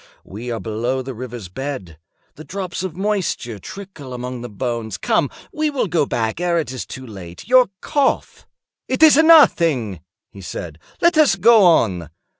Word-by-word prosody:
We 110 +6 -8
are 115 -1 -3
below 120 +4 -2
the 130 +1 -6
river's 120 -4 -7
bed. 95 - -6 0.3
The 155 - -11
drops 185 0 -5
of 185 -4 -5
moisture 190 - -2
trickle 160 - -9
among 125 0 -6
the 120 - -7
bones. 110 -1 -4
Come, 145 -5 +1 0.2
we 305 0 0
will 280 -5 -1
go 165 -6 0
back 110 +7 -2
ere 175 -1 +1
it 150 -7 -2
is 130 - -6
too 130 - -8
late. 95 -6 -10
Your 255 -1 +5
cough—" 285 -3 -1 0.4
"It 260 +4 +1
is 310 -3 +8
nothing," 165 - +5 0.3
he 100 - -12
said; 85 -3 -7 0.2
"let 340 -2 +4
us 305 -8 +5
go 215 +1 +6
on. 95 - +2
130 Hz, 170 wpm, -20 LUFS, -, 0.4 s, is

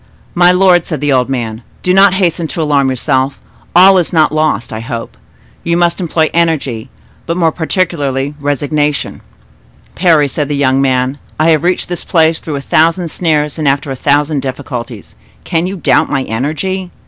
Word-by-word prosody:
"My 175 0 +5
lord," 180 -2 +3
said 155 -5 -3
the 145 0 0
old 125 0 +1
man, 115 -4 -3 0.2
"do 180 - +2
not 195 0 +5
hasten 175 -3 0
to 165 - -4
alarm 140 -3 +2
yourself; 130 +1 -1 0.4
all 190 +2 +7
is 175 - -2
not 155 -3 +3
lost, 155 -9 -1
I 110 - -4
hope. 115 - -6 0.5
You 170 0 0
must 175 +1 +1
employ 160 -2 0
energy, 140 -8 -1 0.4
but 170 +1 -2
more 165 -3 +2
particularly 150 -5 -2
resignation." 145 +1 -2 0.7
"Parry," 165 -5 +3
said 145 +2 -3
the 145 - -1
young 135 -1 +2
man, 130 +1 0 0.2
"I 160 +1 +4
have 155 - +2
reached 180 +2 0
this 175 -1 -4
place 160 -1 +2
through 155 - -5
a 140 - -4
thousand 165 +4 +1
snares 150 -2 -1
and 155 - -1
after 140 0 0
a - - -3
thousand 145 +2 +1
difficulties; 125 -5 -6 0.3
can 165 - -1
you 190 - -4
doubt 170 - +2
my 135 -2 -1
energy? 160 - -3
150 Hz, 175 wpm, -13 LUFS, 135-170 Hz, 0.7 s, all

